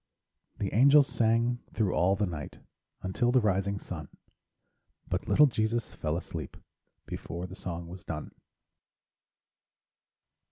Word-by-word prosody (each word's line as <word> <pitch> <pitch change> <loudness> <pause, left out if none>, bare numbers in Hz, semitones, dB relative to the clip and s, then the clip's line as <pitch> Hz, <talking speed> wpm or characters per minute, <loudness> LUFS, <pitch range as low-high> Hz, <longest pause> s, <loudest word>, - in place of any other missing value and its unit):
The 100 - -2
angels 140 +5 +7
sang 115 0 +2
thro' 105 -5 +1
all 95 +3 +3
the 105 +1 +1
night 80 -5 -6 0.5
Until 120 +6 +1
the 130 - +5
rising 100 -2 +1
sun, 80 -7 -7 1.0
But - - -2
little 150 - +7
Jesus 115 -2 0
fell 75 +1 -2
asleep 80 -4 -6 0.5
Before 85 +2 -5
the 90 +1 -8
song 85 -3 -5
was 90 +1 -10
done. 75 -2 -5
100 Hz, 120 wpm, -30 LUFS, 85-115 Hz, 1.0 s, angels